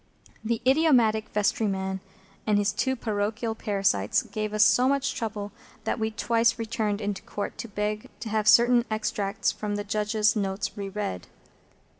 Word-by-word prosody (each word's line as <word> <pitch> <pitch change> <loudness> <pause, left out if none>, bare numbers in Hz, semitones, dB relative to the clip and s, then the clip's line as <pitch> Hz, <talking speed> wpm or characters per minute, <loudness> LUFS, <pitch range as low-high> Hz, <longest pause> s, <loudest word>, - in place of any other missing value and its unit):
The 225 0 -1
idiotic 255 -7 +4
vestryman 195 -3 0 0.5
and 210 -1 +3
his 205 0 +2
two 260 -1 0
parochial 220 0 -2
parasites 195 - +1
gave 215 -1 -4
us 215 0 +4
so 250 +4 +5
much 275 0 +1
trouble 210 -2 -4 0.3
that - - -1
we 220 0 0
twice 230 +1 +1
returned 220 -2 -2
into 205 -1 -3
Court 205 - -5
to - - -4
beg 210 0 -3
to 220 - -4
have 215 0 0
certain 240 +1 +6
extracts 210 -2 -1
from 210 -1 -4
the 205 - -2
Judge's 215 +1 +1
notes 195 -1 -2
re 200 -1 -5
read. 195 - -4
215 Hz, 155 wpm, -26 LUFS, 205-230 Hz, 0.5 s, certain